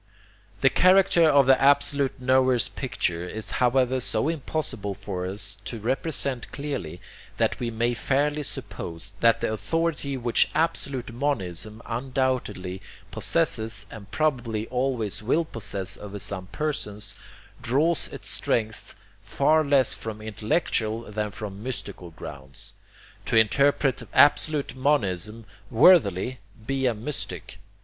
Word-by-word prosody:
The -, -, +5 dB
character 185 Hz, -3 st, +5 dB
of 140 Hz, -2 st, +5 dB
the 130 Hz, 0 st, +5 dB
absolute 140 Hz, -1 st, +3 dB
knower's 130 Hz, -2 st, +3 dB
picture 85 Hz, 0 st, -2 dB
is 110 Hz, 0 st, -6 dB
however 130 Hz, +1 st, +2 dB
so 120 Hz, +3 st, 0 dB
impossible 140 Hz, -10 st, -3 dB
for 95 Hz, -2 st, -5 dB
us 95 Hz, +1 st, -1 dB
to 115 Hz, -, -5 dB
represent 130 Hz, +2 st, 0 dB
clearly, 135 Hz, -, -5 dB, 0.4 s
that -, -, 0 dB
we 120 Hz, -, -2 dB
may 115 Hz, +1 st, 0 dB
fairly 145 Hz, +4 st, 0 dB
suppose 85 Hz, -, -6 dB
that 115 Hz, -1 st, +4 dB
the -, -, 0 dB
authority 155 Hz, +2 st, -1 dB
which 120 Hz, -2 st, +2 dB
absolute 135 Hz, -7 st, -1 dB
monism 110 Hz, -, -3 dB
undoubtedly 120 Hz, -7 st, -2 dB, 0.3 s
possesses, 110 Hz, -1 st, +1 dB
and 105 Hz, -3 st, -10 dB
probably 120 Hz, -6 st, -1 dB
always 125 Hz, -5 st, -1 dB
will 150 Hz, +10 st, +1 dB
possess 100 Hz, -7 st, -4 dB
over 105 Hz, 0 st, -8 dB
some 95 Hz, -1 st, -3 dB
persons, 105 Hz, -6 st, -3 dB, 0.5 s
draws 150 Hz, +7 st, +1 dB
its -, -, -8 dB
strength 110 Hz, -2 st, -1 dB, 0.3 s
far 155 Hz, +3 st, +2 dB
less 140 Hz, -4 st, +3 dB
from 110 Hz, -1 st, -6 dB
intellectual 110 Hz, +1 st, -1 dB
than 105 Hz, 0 st, -2 dB
from 100 Hz, 0 st, -7 dB
mystical 105 Hz, -7 st, -6 dB
grounds. 70 Hz, -4 st, -7 dB, 0.5 s
To -, -, 0 dB
interpret 135 Hz, +5 st, +3 dB
absolute 145 Hz, 0 st, +4 dB
monism 115 Hz, -, 0 dB, 0.2 s
worthily, 125 Hz, -, +4 dB, 0.3 s
be 135 Hz, 0 st, 0 dB
a 120 Hz, -, +1 dB
mystic. 125 Hz, +7 st, -6 dB
120 Hz, 120 wpm, -25 LUFS, 105-140 Hz, 0.5 s, The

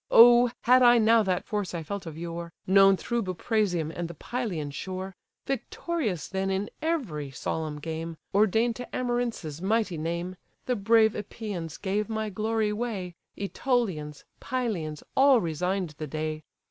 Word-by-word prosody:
Oh! 240 Hz, +1 st, +8 dB
had 255 Hz, +1 st, +5 dB
I 240 Hz, -1 st, +7 dB
now 225 Hz, 0 st, +5 dB
that 185 Hz, -3 st, 0 dB
force 205 Hz, -4 st, -2 dB
I 165 Hz, -, -3 dB
felt 195 Hz, +2 st, -5 dB
of 160 Hz, -1 st, -7 dB
yore, 170 Hz, 0 st, -5 dB
Known 195 Hz, 0 st, +6 dB
through 235 Hz, +4 st, -1 dB
Buprasium 185 Hz, -4 st, 0 dB
and 175 Hz, 0 st, -4 dB
the 170 Hz, -, -9 dB
Pylian 180 Hz, -, -3 dB
shore! 185 Hz, +3 st, -5 dB, 0.3 s
Victorious 270 Hz, -, -2 dB
then 190 Hz, 0 st, -2 dB
in 195 Hz, +2 st, -1 dB
every 235 Hz, -, -2 dB
solemn 150 Hz, +3 st, -3 dB
game, 160 Hz, +1 st, -5 dB, 0.2 s
Ordain'd 220 Hz, +3 st, +3 dB
to 245 Hz, -, -6 dB
Amarynces' 240 Hz, -, -2 dB
mighty 205 Hz, -4 st, 0 dB
name; 170 Hz, +3 st, -3 dB, 0.3 s
The 250 Hz, -, +1 dB
brave 220 Hz, +1 st, +4 dB
Epeians 200 Hz, -6 st, -5 dB
gave 205 Hz, +2 st, -1 dB
my 220 Hz, -1 st, -2 dB
glory 215 Hz, +1 st, 0 dB
way, 210 Hz, -6 st, -3 dB, 0.2 s
Ætolians, 195 Hz, -, -1 dB, 0.2 s
Pylians, 200 Hz, -, -3 dB
all 270 Hz, -2 st, +6 dB
resign'd 180 Hz, +1 st, -1 dB
the 155 Hz, -, -4 dB
day. 155 Hz, +1 st, -3 dB
195 Hz, 145 wpm, -27 LUFS, 170-230 Hz, 0.3 s, Oh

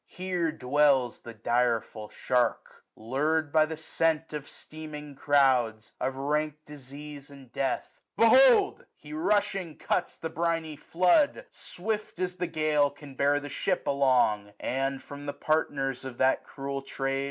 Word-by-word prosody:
Here 180 Hz, -3 st, -2 dB
dwells 135 Hz, -3 st, +2 dB
the 115 Hz, -1 st, -10 dB
direful 115 Hz, -1 st, 0 dB
shark. 125 Hz, -1 st, -1 dB
LurM 145 Hz, +6 st, 0 dB
by 155 Hz, 0 st, +4 dB
the 160 Hz, 0 st, -5 dB
scent 160 Hz, 0 st, +1 dB
1015 150 Hz, -, -2 dB
Of 145 Hz, -, -16 dB
steaming 150 Hz, -2 st, -9 dB
crouds, 130 Hz, -6 st, +2 dB
of 130 Hz, +1 st, -1 dB
rank 150 Hz, +2 st, -1 dB
disease, 145 Hz, +1 st, -10 dB
and 135 Hz, -3 st, -14 dB
death; 135 Hz, -2 st, -3 dB, 0.2 s
$S -, -, +4 dB
SUMMER* -, -, +8 dB
Behold! 245 Hz, -, +3 dB
he 150 Hz, 0 st, -12 dB
rushing 195 Hz, 0 st, 0 dB
cuts -, -, -1 dB
the 160 Hz, -, -5 dB
briny 165 Hz, -2 st, -1 dB
floods 185 Hz, -, +2 dB
Swift 215 Hz, +3 st, -5 dB
as 185 Hz, 0 st, -2 dB
the 180 Hz, 0 st, -1 dB
gale 155 Hz, -3 st, +2 dB
can 145 Hz, -1 st, -13 dB
bear 140 Hz, +2 st, +2 dB
the 145 Hz, -, -7 dB
ship 180 Hz, +6 st, -1 dB
along; 125 Hz, -7 st, +2 dB
And, 135 Hz, 0 st, -2 dB
from 145 Hz, +1 st, -9 dB
the 145 Hz, -, -2 dB
partners 135 Hz, -4 st, -1 dB
of 130 Hz, -2 st, -7 dB
that 130 Hz, 0 st, +2 dB
cruel 140 Hz, 0 st, -5 dB
trade. 135 Hz, 0 st, -2 dB
145 Hz, 155 wpm, -28 LUFS, 135-160 Hz, 0.2 s, SUMMER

